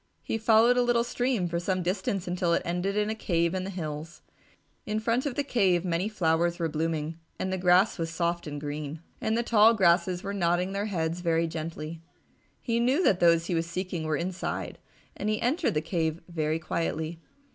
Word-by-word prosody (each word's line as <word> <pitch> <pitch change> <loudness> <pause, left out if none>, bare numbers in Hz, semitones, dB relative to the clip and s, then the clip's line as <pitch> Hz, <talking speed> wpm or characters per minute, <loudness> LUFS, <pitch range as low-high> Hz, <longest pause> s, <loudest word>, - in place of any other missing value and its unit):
He 225 - -2
followed 225 +2 +5
a - - +5
little 240 -1 +2
stream 240 -5 0
for 170 0 -2
some 185 +1 -1
distance 185 +1 -1
until 175 -1 0
it - - -1
ended 180 +4 -1
in 210 +1 +1
a - - 0
cave 170 -5 0
in 185 0 -2
the - - -4
hills. 155 -3 -6 0.6
In 215 0 0
front 230 +5 0
of 265 - -3
the 285 - 0
cave 190 -10 +2
many 180 +3 0
flowers 170 -3 +1
were 170 -2 0
blooming 160 0 -2 0.2
and 190 0 -2
the - - 0
grass 180 +3 +4
was 165 -1 -1
soft 170 0 -1
and 145 -1 -5
green, 150 +1 -5 0.2
and 220 +1 0
the 235 - +1
tall 225 0 +5
grasses 180 -2 +3
were 200 - -3
nodding 180 0 +1
their 200 +2 -2
heads 165 -3 -2
very 165 -1 +2
gently. 160 0 -5 0.6
He 235 -1 -1
knew 260 +9 +2
that 185 - +3
those 170 -1 +4
he 175 - -2
was 165 0 0
seeking 180 -1 -3
were 155 -1 0
inside, 180 +1 -4 0.4
and 210 - -2
he 215 - 0
entered 290 - +1
the 150 - +2
cave 160 -1 -1
very 160 -2 -1
quietly. 160 0 -3
175 Hz, 200 wpm, -28 LUFS, 165-210 Hz, 0.6 s, followed